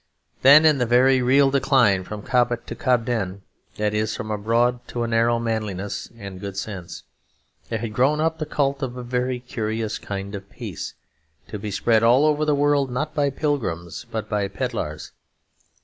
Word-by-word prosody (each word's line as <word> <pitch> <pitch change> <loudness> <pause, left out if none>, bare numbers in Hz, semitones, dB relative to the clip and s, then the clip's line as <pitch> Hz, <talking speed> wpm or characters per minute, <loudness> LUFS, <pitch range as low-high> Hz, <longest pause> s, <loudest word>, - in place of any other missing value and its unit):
Then, 145 +4 +8
in 150 -3 +5
the 125 - +1
very 130 +2 +4
real 135 +2 +4
decline 130 -8 +3
from 105 +2 -7
Cobbett 120 -1 +1
to - - -6
Cobden 115 -6 0 0.3
(that 105 0 0
is, 110 +1 -1
from 110 - -5
a 105 - -1
broad 120 +3 +2
to 120 - -3
a - - -1
narrow 115 +1 +2
manliness 110 -4 -3
and 100 -4 -8
good 100 0 -6
sense) 95 -4 -6 0.7
there 115 - -1
had 110 -1 -5
grown 135 +6 +2
up 160 +1 0
the 155 - -3
cult 140 -2 0
of 125 -2 -4
a 125 - -5
very 125 +1 -1
curious 110 -3 -3
kind 100 0 -6
of 100 -1 -7
peace, - - -7 0.5
to 105 - -5
be 105 +1 -5
spread 110 +2 +2
all 120 +6 +5
over 155 0 +2
the 150 -1 +2
world 145 -1 +2
not 150 +5 -3
by 145 -3 +1
pilgrims, 120 - -3
but 110 -1 -4
by 105 -1 -1
pedlars. 100 - -4
120 Hz, 180 wpm, -23 LUFS, 105-135 Hz, 0.7 s, Then